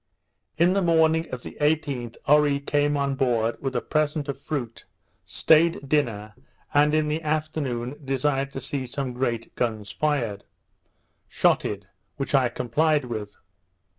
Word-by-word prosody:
In 175 +3 +4
the 195 - +2
morning 160 -1 +3
of 125 -1 -6
the - - -9
18th, 145 -6 0
Oree 145 -1 +4
came 145 +1 +1
on 140 -1 0
board 120 -4 +1
with 135 -1 -3
a 120 - +1
present 150 -1 0
of 140 - -5
fruit, 125 -7 -5 0.4
stayed 160 -2 +3
dinner, 115 -8 0 0.4
and 150 +1 +4
in 155 -1 +2
the 155 +2 -1
afternoon 150 -5 -2
desired 135 0 0
to 135 - -5
see 135 -1 -3
some 130 0 -4
great 120 -2 -2
guns 110 -4 -2
fired, 120 -10 -1 0.9
shotted, 100 -1 +1 0.3
which 135 0 -4
I 130 -3 +4
complied 150 +5 +1
with. 110 -4 -5
140 Hz, 140 wpm, -25 LUFS, 120-150 Hz, 0.9 s, In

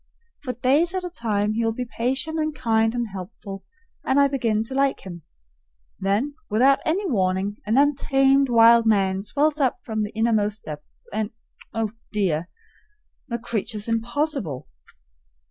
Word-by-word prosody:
For 255 -4 -4
days 285 +9 +2
at 370 - -2
a 360 - -5
time 215 - -1
he 230 +1 0
will 225 0 +1
be 250 +2 -4
patient 265 +7 -1
and 310 -1 -1
kind 225 -3 +1
and 240 -2 -2
helpful, 195 0 -8 0.4
and 265 +2 +2
I 280 - +6
begin 230 -6 0
to 225 - -7
like 275 0 +1
him; 175 -3 -9 0.8
then 205 +9 0 0.2
without 260 +6 +4
any 370 +6 +1
warning 195 - 0
an 220 +4 +2
untamed 275 -1 +3
wild 230 0 +6
man 195 -3 +2
swells 295 +8 0
up 265 -4 +2
from 220 -5 -3
the 210 - -2
innermost 215 -2 0
depths, 150 -1 -10
and 215 0 -1 0.5
oh, 225 -2 -1 0.2
dear! 180 -6 0 0.8
the 235 - -2
creature's 225 -2 -3
impossible. 230 - -1
230 Hz, 150 wpm, -23 LUFS, 210-275 Hz, 0.8 s, I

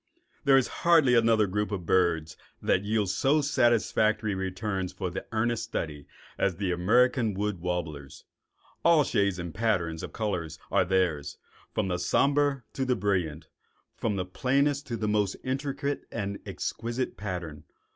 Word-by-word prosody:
There 135 -1 +6
is 130 - +3
hardly 165 -7 +5
another 115 -2 +4
group 105 +2 -2
of 95 -4 -3
birds 80 -3 +1 0.2
that 95 - +1
yields 105 -2 0
so 140 +8 +3
satisfactory 115 -5 +2
returns 95 0 -3
for 90 -3 -4 0.2
earnest 110 +1 0
study 75 -9 -5 0.3
as 95 - +1
the 95 0 -1
American 115 +5 +3
wood 105 -2 -2
warblers. 85 -6 -4 0.6
All 165 -3 +6
shades 100 -7 +1
and 85 -2 -5
patterns 90 -7 0
of - - -6
color 100 -7 -2 0.2
are 90 - +3
theirs, 85 -6 0 0.4
from 95 -4 0
somber 140 +6 +2
to 130 -2 0
brilliant, 90 -7 -1 0.5
from 110 -3 -1
the 90 -2 -2
plainest 140 +8 0
to 120 -3 -3
the 105 -1 -2
most 105 -2 +1
intricate 140 +1 -2
and 100 0 -3
exquisite 120 +2 -3
pattern. 90 -7 -6
105 Hz, 140 wpm, -28 LUFS, 90-125 Hz, 0.6 s, There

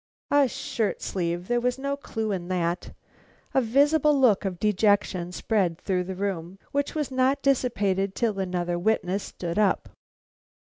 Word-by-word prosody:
A 285 -1 +5
shirt 220 -2 -2
sleeve! 175 -1 -2
There 240 0 +1
was 250 +1 0
no 280 +1 -2
clue 225 -6 -4
in 180 -3 -3
that. 175 -1 -2 0.6
A 265 - +4
visible 285 +4 +3
look 220 -6 +4
of 180 -3 -3
dejection 205 -3 +2
spread 180 -3 0
through 180 0 -1
the 190 +1 -5
room, 185 -2 -3
which 285 +2 -1
was 300 -3 -2
not 260 +2 +1
dissipated 200 -8 +1
till 220 -5 0
another 175 -2 -1
witness 195 -1 +1
stood 170 +1 -4
up. 205 -2 +2
205 Hz, 150 wpm, -26 LUFS, 180-255 Hz, 0.6 s, A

